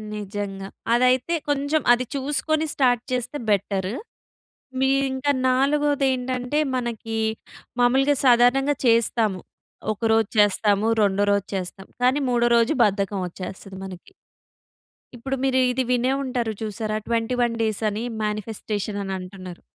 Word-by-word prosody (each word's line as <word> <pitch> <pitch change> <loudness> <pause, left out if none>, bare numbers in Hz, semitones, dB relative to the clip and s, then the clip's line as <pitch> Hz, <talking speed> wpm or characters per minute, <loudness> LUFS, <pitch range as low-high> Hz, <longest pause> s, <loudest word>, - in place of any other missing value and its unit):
నిజంగా 200 -1 -5 0.3
అదైతే 255 +6 +3
కొంచెం 290 +2 +1
అది 250 +1 0
చూసుకొని 295 +3 0
స్టార్ట్ 245 -3 +2
చేస్తే 250 +3 -2
బెటర్. 195 -1 0 0.9
మీరింకా 270 +1 +1 0.2
నాలుగోది 280 +2 +2
ఏంటంటే 255 +2 -2 0.2
మనకి 230 -2 -3 0.6
మాములుగా 265 +4 +4
సాధారణంగా 250 +4 +4
చేస్తాము. 230 -4 +2 0.5
ఒక 210 - -11
రోజు 225 -2 +3
చేస్తాము. 205 0 +3 0.2
రెండో 200 0 +2
రోజు 200 -1 0
చేస్తాము. 190 +1 -5
కానీ 255 +3 +3
మూడో 240 -1 +2
రోజు 230 +4 +3
బద్ధకం 200 -1 0
వచ్చేస్తది 190 +2 -8
మనకి. 190 - -10 1.0
ఇప్పుడు 270 +3 -3
మీరు 260 -1 +2
ఇది 260 +1 0
వినే 250 +1 +2
ఉంటారు 245 -4 -2
చూసారా 215 0 -3
21 235 +1 0
డేస్ 220 -2 -1
అని 210 +2 -4 0.2
మానిఫెస్టేషన్ 210 -1 -3
అని 195 0 -4
అంటున్నారు. 185 -1 -9
235 Hz, 120 wpm, -23 LUFS, 205-260 Hz, 1.0 s, మాములుగా